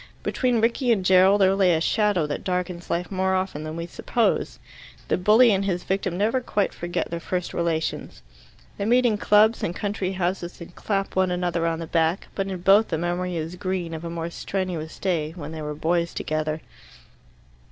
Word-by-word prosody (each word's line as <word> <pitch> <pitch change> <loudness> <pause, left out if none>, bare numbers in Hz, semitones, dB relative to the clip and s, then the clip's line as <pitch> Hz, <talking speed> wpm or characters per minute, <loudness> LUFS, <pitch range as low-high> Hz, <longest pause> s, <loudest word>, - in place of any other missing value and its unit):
Between 245 -3 +1
Rickie 240 +2 +2
and 195 -5 +1
Gerald 190 +2 +5
there 190 0 +5
lay 190 -3 +3
a - - +1
shadow 205 -1 +1
that 150 - -4
darkens 180 -1 -3
life 175 +3 -2
more 190 0 +1
often 185 -5 -2
than 155 0 -5
we 170 0 -4
suppose. 230 +6 -1 0.5
The - - +3
bully 220 +6 +5
and 195 -1 +1
his 180 -2 -1
victim 190 -2 -2
never 225 +6 +1
quite 205 -5 -1
forget 175 -1 -3
their 170 - -3
first 180 +1 -3
relations. 160 - -2 0.6
They 200 - -1
meet 245 +3 +4
in 215 -3 +2
clubs 215 +3 +4
and 175 - -2
country 200 -2 -2
houses, 180 -1 -3
and 170 0 -10
clap 195 0 -2
one 190 -1 +2
another 175 -2 0
on 165 -1 -1
the 165 - -5
back; 165 +2 0
but 195 -1 -2
in 185 -2 -5
both 200 +4 +5
the 160 - -2
memory 175 +2 -2
is 165 +2 -4
green 185 -3 -3
of 160 0 -6
a 170 - -4
more 170 0 -4
strenuous 180 -4 -4
day, 165 -5 -1
when 155 -3 -7
they 160 -1 -6
were 150 0 -4
boys 170 +2 0
together. 155 0 -2
180 Hz, 195 wpm, -24 LUFS, 170-195 Hz, 0.6 s, Gerald